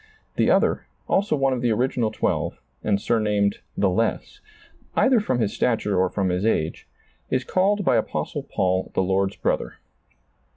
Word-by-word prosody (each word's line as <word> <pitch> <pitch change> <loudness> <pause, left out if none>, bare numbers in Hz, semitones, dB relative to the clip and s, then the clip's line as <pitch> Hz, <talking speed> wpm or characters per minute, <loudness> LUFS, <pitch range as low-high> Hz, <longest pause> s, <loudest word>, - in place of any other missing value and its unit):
The - - +2
other, - - +2 0.2
also 200 +2 +2
one 135 -2 +2
of 125 - -2
the 120 - +2
original 120 0 +1
twelve, - - -2 0.2
and 100 -2 +1
surnamed 105 -3 +1 0.2
"the 100 - +3
less," 115 - -1 0.6
either 260 -3 +4
from 130 - -1
his 110 -4 0
stature 110 -4 0
or 95 0 +2
from 95 0 -1
his 90 +1 -1
age, 80 -8 -1 0.4
is 130 0 0
called 195 +7 +1
by - - +4
Apostle - - -2
Paul, 95 0 -1
the - - +2
Lord's 95 +1 0
brother. - - -1
110 Hz, 160 wpm, -24 LUFS, 95-130 Hz, 0.6 s, either